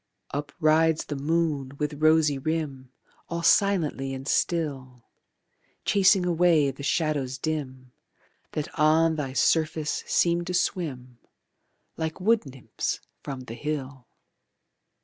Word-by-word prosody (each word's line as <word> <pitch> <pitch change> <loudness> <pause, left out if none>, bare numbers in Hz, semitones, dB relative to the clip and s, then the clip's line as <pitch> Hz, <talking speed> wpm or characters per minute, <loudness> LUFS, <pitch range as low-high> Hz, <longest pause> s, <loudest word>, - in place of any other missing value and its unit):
Up 145 +1 -3
rides 160 0 +3
the 145 - -4
moon 145 -2 -1
with 150 0 -3
rosy 155 -3 +4
rim 140 -4 -3 0.4
All 170 0 -3
silently 160 -8 +2
and 135 +1 -8
still, 135 -9 -1 0.8
Chasing 195 -2 +4
away 170 -4 +3
the 135 - -11
shadows 140 -3 -1
dim 130 -4 -4 0.6
That 150 -1 -4
on 160 +2 +4
thy 140 -4 -4
surface 155 +1 +1
seem 170 0 +2
to 180 0 -3
swim 130 - -2 0.8
Like 160 +1 -3
wood 215 -2 +2
nymphs 130 -3 -4 0.2
from 135 -2 -6
the 120 -3 -8
hill. 135 -2 -5
150 Hz, 115 wpm, -26 LUFS, 135-165 Hz, 0.8 s, rosy